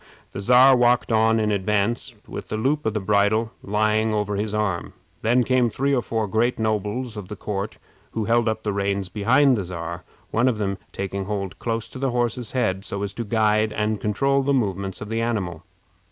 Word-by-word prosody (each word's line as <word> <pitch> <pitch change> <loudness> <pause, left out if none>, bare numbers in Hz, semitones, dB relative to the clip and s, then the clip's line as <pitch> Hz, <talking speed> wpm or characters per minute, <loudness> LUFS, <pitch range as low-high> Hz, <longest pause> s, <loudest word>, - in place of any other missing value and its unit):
The 100 - -5
Czar 125 +5 +7
walked 120 0 +3
on 110 0 +4
in 105 -1 +1
advance, 105 +5 0
with - - -7
the 110 - -3
loop 140 +4 0
of 110 - -1
the - - +1
bridle 105 +3 +2
lying 110 +1 +1
over 105 -1 -1
his 105 +1 -2
arm. 105 -5 -1 0.3
Then 120 +3 +3
came 125 -1 +2
three 140 +5 0
or 125 - +2
four 110 -2 -2
great 115 +5 +1
nobles 110 +2 -2
of 100 -3 -6
the 105 - -6
court, 100 +1 -4 0.4
who 110 -2 -1
held 115 0 +3
up 110 0 -3
the 105 - -1
reins 100 -1 -1
behind 130 +7 +4
the 105 - -2
Czar, 85 0 -6 0.3
one 115 +3 +2
of 125 -4 +1
them 100 -2 -2
taking 95 0 -4
hold 100 -2 -4
close 115 -1 -2
to 130 - -9
the 135 0 0
horse's 120 -1 -2
head, 95 -7 0
so 100 -1 -4
as 100 -1 -3
to 115 - -4
guide 110 0 +2
and 105 -1 -1
control 135 +6 +1
the 140 +1 +1
movements 100 -5 -2
of 105 - -6
the 115 0 0
animal. 95 -8 -2
110 Hz, 205 wpm, -23 LUFS, 100-120 Hz, 0.4 s, Czar